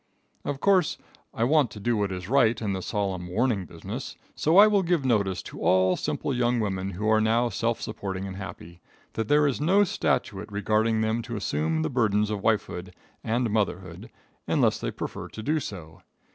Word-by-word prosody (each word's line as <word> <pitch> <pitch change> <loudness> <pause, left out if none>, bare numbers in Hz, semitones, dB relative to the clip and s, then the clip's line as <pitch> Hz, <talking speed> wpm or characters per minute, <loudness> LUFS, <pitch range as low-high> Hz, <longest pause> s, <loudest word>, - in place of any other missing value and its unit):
] - - -41
Of 140 - -6
course 195 0 +3 0.3
I 115 - -2
want 145 0 +3
to 105 - -10
do 120 +3 0
what 100 -2 0
is 90 -1 -5
right 115 -3 +3
in 105 -3 -2
the 95 - -3
solemn 95 -3 -2
warning 100 -1 0
business, - - -7 0.2
so 160 +4 +2
I 205 - +10
will 210 -2 +3
give 170 -6 0
notice 100 -7 +1
to - - -9
all 95 0 +3
simple 140 - -2
young 120 -1 +1
women 95 -3 -2
who 105 +5 -3
are 110 0 +4
now 115 +2 +2
self 115 +2 -1
supporting 100 -3 -5
and 95 -1 -6
happy, 90 -3 -9 0.3
that 110 -1 -2
there 150 +3 +4
is 140 -1 0
no 190 +7 +4
statute 105 - -1
requiring 110 +2 +1
them 110 +1 0
to 115 0 -6
assume 80 -5 -1
the 80 - -1
burdens 105 -3 +1
of 105 -2 -3
wifehood 95 -4 -1 0.3
and 115 0 0
motherhood 95 -5 -2 0.4
unless - - +2
they - - -2
prefer - - -6
to 110 - -9
do 155 +5 +1
so. 85 - -8
110 Hz, 195 wpm, -26 LUFS, 95-120 Hz, 0.4 s, I